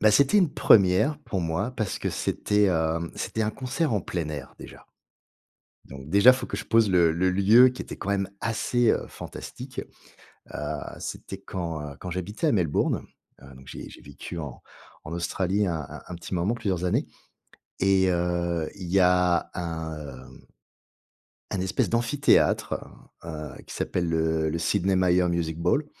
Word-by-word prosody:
bah 110 - +6
c'était 140 - +5
une 175 -7 +2
première 100 +9 +4
pour 95 -10 -4
moi 90 +9 -1
parce 110 -3 -2
que - - -2
c'était, 105 -1 +1
heu, 80 -1 0
c'était 110 - -2
un 105 - 0
concert 130 +4 -2
en 105 - +1
plein 85 -3 -3
air 70 -4 -7
déjà. - - -12 1.0
Donc, 70 +1 -10
déjà, 100 +8 +7
il 130 - +3
faut 125 - -5
que - - -4
je - - -5
pose 115 -2 +4
le 85 -3 +5
le 90 +3 +1
lieu 105 +7 +6
qui 125 - -5
était - - -8
quand 100 - -4
même 100 -1 0
assez 115 +1 +1
heu, - - -1
fantastique. 130 0 -8 0.7
Heu, - - -4 0.4
c'était 95 - -6
quand, 85 -5 -5
heu, - - -14
quand 90 - -6
j'habitais 105 - -2
à - - +3
Melbourne, 85 -8 +1 0.4
heu, 65 -1 -13
donc 65 +1 -15
j'ai - - -8
j'ai - - -14
vécu 85 - -8
en 70 -6 -7 0.4
en 75 - -7
Australie 95 +4 0
un 80 -3 -1
un - - -9
un 90 - -6
petit 90 - -6
moment, 90 +6 +1
plusieurs 95 -6 -2
années. 90 - +1 0.7
Et 95 -1 +4
heu, 85 -2 0
il 95 -3 -8
y 95 +2 +3
a 90 -1 +3
un 80 -3 -4
heu 65 -3 -11 1.1
un 95 - -1
espèce 95 +2 0
d'amphithéâtre 120 +5 +2 0.5
heu, 75 -4 -7
qui - - -9
s'appelle 85 -1 -1
le 80 -1 +1
le 85 - -2
Sidney 95 +2 +1
Myer 90 -1 +3
Music 85 -2 -1
Bowl, 90 - +1
90 Hz, 175 wpm, -26 LUFS, 85-105 Hz, 1.1 s, déjà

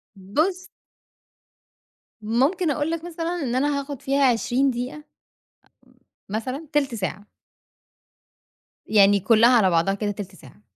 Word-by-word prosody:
بُص 315 - -2 1.5
ممكن 275 - +1
أقول 295 +2 -1
لك 330 -1 -3
مثلًا 340 0 -4
إن 245 -2 -2
أنا 285 +2 +1
هاخد 280 -2 -7
فيها 275 +1 +1
20 250 +3 +1
دقيقة، 250 +3 -5
أم 300 - -11 1.3
مثلًا، 255 +9 -4
تِلت 280 -5 +1
ساعة. 205 0 -5 1.6
يعني 205 -1 +5
كُلّها 225 +4 +4
على 195 -5 +4
بعضها 170 +3 +2
كده 205 +1 -2
تِلت 195 -2 -8
ساعة. 130 -9 -17
250 Hz, 125 wpm, -23 LUFS, 205-295 Hz, 1.6 s, يعني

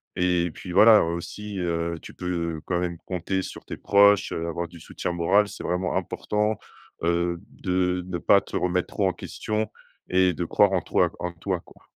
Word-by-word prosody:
et 90 -1 +2
puis, 90 - -9
voilà, 105 +4 +8
heu, - - +2
aussi, 100 +4 -6
heu, 85 -1 -1
tu - - -11
peux 85 -3 -3
quand 90 -1 0
même 85 -1 -2
compter 95 +1 -2
sur - - -8
tes - - -7
proches, 100 0 +5
heu, 85 0 -3
avoir 85 +1 -3
du 85 0 -13
soutien 85 - -4
moral. 95 +5 +3
C'est 105 - -9
vraiment 90 +1 -1
important, 105 0 -1 0.5
heu, 85 0 +1
de 90 0 0
ne 90 -1 -3
pas 85 - +5
te - - -9
remettre 90 0 0
trop 100 - 0
en 95 - 0
question 110 +4 -3 0.4
et 95 0 +4
de 90 - -3
croire 100 +4 +3
en 90 - +2
toi, - - +2
q - - -19
en 90 - -3
toi, 90 +2 -2
quoi. - - -20
90 Hz, 200 wpm, -25 LUFS, 85-95 Hz, 0.5 s, voilà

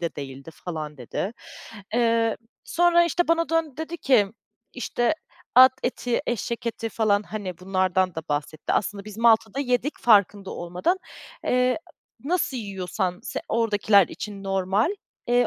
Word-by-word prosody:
de 170 -1 -3
değildi" 135 +1 -7
falan 155 -4 -6
dedi. 135 - -4 0.6
Eee, 230 -1 +2 0.3
sonra, 345 0 +4
işte, 345 +1 0
bana 335 0 +2
döndü 325 -4 0
dedi 320 +2 -5
ki, 250 -10 +4 0.5
işte, 240 +1 0 0.4
at 260 0 +10
eti, 245 -1 -1
eşek 235 0 -3
eti 230 0 -2
falan, 210 -2 +2
hani, 200 -5 -6
bunlardan 185 -1 +1
da 160 - -4
bahsetti. 150 +1 -2
Aslında 200 0 -1
biz 215 0 -9
Malta'da 230 +1 +4
yedik 250 +2 -1
farkında 205 -3 +4
olmadan. 180 - -1 0.5
Eee, 250 +2 +2 0.5
nasıl 325 -5 0
yiyorsan 190 -3 -3
se - - -4
oradakiler 210 -4 +3
için 200 -2 -7
normal, 195 - +1 0.4
eee, 245 0 +4
215 Hz, 135 wpm, -25 LUFS, 185-250 Hz, 0.6 s, at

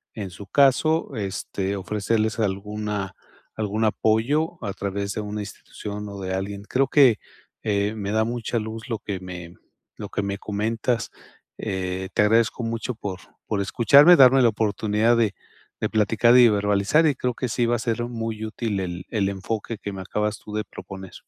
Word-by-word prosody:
en 100 -4 -5
su 95 +2 -11
caso, 140 - +3
este, 100 -1 -3
ofrecerles 105 +3 -1
alguna 105 -1 -2 0.4
algún 110 +1 -1
apoyo, 125 +11 +1
a 100 - -3
través 100 0 -3
de 110 - -3
una 105 0 -4
institución, 105 +1 -7
o 100 0 -8
de 95 0 -3
alguien. 100 +1 -4
Creo 135 +5 +1
que, 130 -7 +5 0.4
eh, 105 -1 0
me 100 -2 -4
da 110 0 +2
mucha 120 0 -2
luz, 110 +2 -5
lo 115 - -1
que 100 -2 -5
me 90 -2 -8 0.4
lo - - -7
que 105 - -2
me 100 0 -3
comentas. 110 +3 -1 0.5
Eh, 95 0 -3
te 105 - +4
agradezco 115 +3 +2
mucho, 115 +1 -3
por 95 -4 -5 0.3
por 105 -2 -1
escucharme. 140 - +6
Darme 135 -2 +7
la 120 - +6
oportunidad 110 +1 +1
de 110 -4 +1 0.4
de - - -1
platicar, 115 +2 +3
y 120 -1 +8
verbalizar. 105 +8 +2
Y 150 - +4
creo 125 -1 -1
que 125 - -2
sí, 120 +1 +1
va 120 - +2
a - - -2
ser 115 +1 -1
muy 115 -2 -4
útil 110 -2 -3
el 90 -1 -4
el 100 -4 +1
enfoque, 105 +3 -4
que 100 - -6
me 95 - -6
acabas 105 +3 -2
tú 105 - -11
de 105 0 -1
proponer. 95 -3 -10
105 Hz, 180 wpm, -24 LUFS, 100-115 Hz, 0.5 s, y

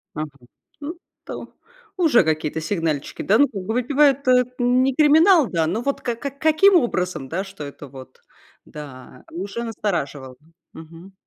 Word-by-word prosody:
Ага, 155 0 -4 0.5
ну, 305 +4 -5 0.3
то - - -8 0.4
Уже 315 - +4
какие-то 155 0 -1
сигнальчики, 160 -4 -3
да, 210 - +3
ну 285 - +5
как 200 -7 -7
бы 220 - -3
выпивает- 275 +2 +2
это 250 0 +5
не 250 +2 +2
криминал, 315 +1 +5
да, 165 -2 0
но 200 +8 -2
вот 280 +3 -2
ка 240 - -2
как 275 +3 -7
каким 315 +5 +4
образом, 180 - 0
да, 185 +6 -2
что 195 -5 -10
это 145 0 -9
вот, 130 -1 -13 0.5
да, 130 -4 -11
уже 200 +7 -5
настораживало. 155 - -4 0.4
Мгм. 165 +4 -13
200 Hz, 155 wpm, -22 LUFS, -, 0.5 s, ну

